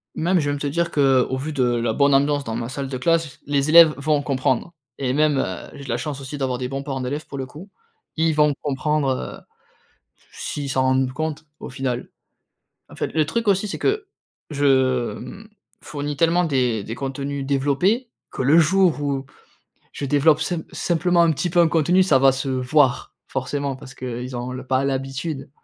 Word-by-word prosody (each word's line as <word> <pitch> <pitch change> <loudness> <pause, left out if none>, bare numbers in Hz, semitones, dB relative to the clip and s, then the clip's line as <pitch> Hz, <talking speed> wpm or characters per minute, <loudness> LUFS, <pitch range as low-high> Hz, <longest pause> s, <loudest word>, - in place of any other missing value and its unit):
même, 180 +3 +2
je 150 - -1
vais 145 - 0
même 145 - -3
te 145 - -2
dire 170 +3 -1
qu'au 135 -2 +2
vu 155 +4 -4
de 135 -3 +1
la 120 -2 +1
bonne 140 +2 +3
ambiance 140 +1 +2
dans 115 -2 -4
ma 115 0 -3
salle 135 +1 -5
de 130 - -3
classe, 165 0 0
les 140 0 0
élèves 160 -1 +8
vont 145 +1 +1
comprendre 135 +3 -1 0.2
et 130 -2 -1
même, 150 0 +2
heu, 90 -7 -4
j'ai 140 - -10
de - - -10
la 115 - 0
chance 140 +2 -4
aussi 135 +2 -6
d'avoir 130 -2 -2
des 125 - -2
bons 135 +1 -4
parents 135 -2 -4
d'élèves 145 +5 -4
pour 140 - -8
le 130 - -3
coup. 160 +9 -12 0.5
Ils 160 0 +2
vont 150 -1 +4
comprendre, 145 0 0
heu, - - -7 0.9
s'ils 140 -2 -4
s'en 130 0 +1
rendent 130 0 +1
compte 155 +1 -4 0.2
au - - -7
final. 125 -1 -3 0.8
En - - -14
fait, - - -2
le 155 -2 +2
truc 225 +7 -2
aussi 195 +1 +2
c'est - - -4
que, 420 0 0 0.4
je, 130 -5 +2
mmh, 200 - -10 0.3
fournis 145 0 -5
tellement 170 +3 +3
des 125 -8 0
des 115 - -5
contenus 140 +2 -4
développés 145 - +1 0.2
que - - -4
le 145 +6 +5
jour 170 -1 +3
où 140 -2 -2 0.7
je 145 - -5
développe 145 +2 +3
simp 170 -3 -1
simplement 175 0 +2
un 165 - +4
petit 175 +4 -2
peu 175 - 0
un 165 - +5
contenu, 170 +4 +3
ça 140 -8 +4
va 135 0 +6
se 135 +1 -3
voir, 130 +1 +1
forcément 135 +1 -3
parce 130 0 -12
qu'ils 125 0 -5
ont 125 +1 -4
l 130 0 -6
pas 130 +1 +1
l'habitude. 135 +1 -3
140 Hz, 200 wpm, -22 LUFS, 130-155 Hz, 0.9 s, élèves